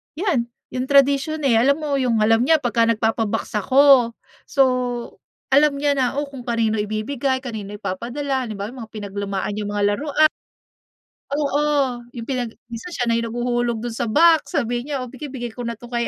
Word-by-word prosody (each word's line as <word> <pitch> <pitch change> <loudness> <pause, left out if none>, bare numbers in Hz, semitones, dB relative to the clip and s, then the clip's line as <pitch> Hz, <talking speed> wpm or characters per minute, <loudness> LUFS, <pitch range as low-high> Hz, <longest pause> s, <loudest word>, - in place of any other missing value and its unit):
yan, 310 - 0 0.2
yung 255 +1 -3
tradisyon, 280 +2 +3
eh, 230 -3 +4
alam 275 +4 +4
mo, 295 -2 -1
yung 240 -4 +1
alam 225 +1 +4
niya 320 +5 +5
'pag 230 -1 +2
nagpapa-box 225 -1 0
ako. 260 0 +5 0.3
So, 275 -2 +4 0.9
alam 285 +1 +5
niya 290 0 +2
na, 260 -1 0
oh, - - 0
kung 270 -3 -9
kanino 230 -2 +1
ibibigay, 235 +6 -1
kanino 210 -5 -6
ipapadala, 255 +7 -3
halimbawa, 210 0 -5
yung 260 - -11
mga 225 - -13
pinaglumaan 200 -1 -3
niyang 210 -1 -3
mga 205 - 0
larua 305 +3 +3 1.1
Oo, 290 -1 0 0.6
yung 235 - -5
pinag 245 -4 -3 0.2
minsan 235 +8 -6
siya 245 - -1
na 230 -1 +1
yung 230 - -2
naghuhulog 240 -1 -1
do'n 240 - -3
sa 230 - -3
box, 325 +7 +4
sabi 245 -2 -1
niya, 280 -3 -2
"Oh, 250 - -9
bigay-bigay 260 -3 -6
ko 240 +1 -6
na 235 - -3
'to 240 +2 -13
kay 235 -1 0
240 Hz, 180 wpm, -21 LUFS, 225-280 Hz, 1.1 s, niya